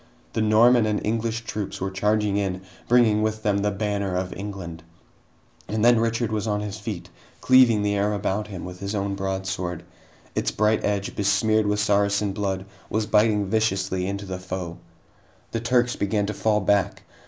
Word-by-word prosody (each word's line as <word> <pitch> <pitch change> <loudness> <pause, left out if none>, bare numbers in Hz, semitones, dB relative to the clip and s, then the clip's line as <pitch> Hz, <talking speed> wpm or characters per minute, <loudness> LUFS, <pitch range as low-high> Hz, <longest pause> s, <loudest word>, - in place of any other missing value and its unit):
The 110 - 0
Norman 110 +2 +5
and 105 -1 0
English 115 +1 -1
troops 105 -3 -5
were 95 +1 -2
charging 105 +1 +1
in, 95 -2 -1 0.3
bringing 115 -3 +4
with 110 0 -1
them 100 -2 +2
the 105 +1 +1
banner 100 -2 -2
of 90 0 -2
England! 95 -4 -7 0.9
And 110 +1 0
then 120 -1 +6
Richard 115 0 0
was 110 0 -1
on 105 -1 0
his 105 0 -5
feet, 100 -4 -6 0.3
cleaving 125 -5 +5
the 105 0 +1
air 100 +1 +1
about 100 +1 -2
him 95 -4 -7
with 90 0 -8
his 100 +2 -4
own 100 0 -1
broadsword. 95 -3 -3 0.5
Its - - 0
bright 110 +1 +1
edge, 100 -1 -1
besmeared 110 +1 +2
with 105 0 +1
Saracen 100 -1 +2
blood, 95 -2 -2 0.2
was 110 0 0
biting 105 -1 +3
viciously 95 -3 0
into 100 +1 -4
the 95 -1 -5
foe. 90 -2 -6 0.7
The 115 - -1
Turks 120 +1 +1
began 100 0 0
to 105 - -3
fall 105 +1 +1
back. 100 0 +1
105 Hz, 175 wpm, -24 LUFS, 95-110 Hz, 0.9 s, then